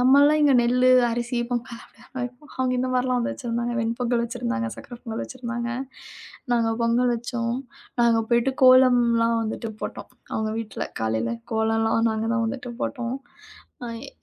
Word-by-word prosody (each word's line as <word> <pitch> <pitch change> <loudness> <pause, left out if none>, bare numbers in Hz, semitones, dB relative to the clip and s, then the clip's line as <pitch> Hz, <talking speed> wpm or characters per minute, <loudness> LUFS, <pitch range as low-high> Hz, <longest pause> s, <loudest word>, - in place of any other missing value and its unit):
நம்மல்லாம் 285 +4 +6
இங்க 285 -2 +5
நெல்லு, 250 +2 +3 0.2
அரிசி 240 +1 -2
பொங்கல் 240 -1 -3
அப்டித்தானே 250 +2 -11
வெப்போம். 250 +5 -10
அவங்க 255 -1 +1
இந்த 255 +1 0
மாதிரி 250 0 +1
எல்லாம் 250 0 +1
வச்சிருந்தாங்க. 240 -3 -3
வெண் 225 +1 -1
பொங்கல் 240 -1 +1
வச்சிருந்தாங்க, 115 - -2
சக்கரை 240 - -10
பொங்கல் 225 -2 -4
வச்சிருந்தாங்க 240 -2 -5 0.8
நாங்க 230 -1 +2
பொங்கல் 240 +1 +2
வச்சோம். 235 0 -2 0.4
நாங்க 230 -1 +4
போயிட்டு 235 +3 +3
கோலம்லாம் 240 -3 +5
வந்துட்டு 220 +1 -4
போட்டோம், - - -6 0.2
அவங்க 220 0 -1
வீட்ல. 225 -2 -4 0.2
காலையில 110 +1 0 0.2
கோலம்லாம் 225 +1 +2
நாங்க 220 0 -2
தான் 235 -1 +1
வந்துட்டு 245 0 -5
போட்டோம். 250 -1 -2 0.7
ஆ, - - -5 0.2
எ - - -8
240 Hz, 150 wpm, -24 LUFS, 230-250 Hz, 0.8 s, நம்மல்லாம்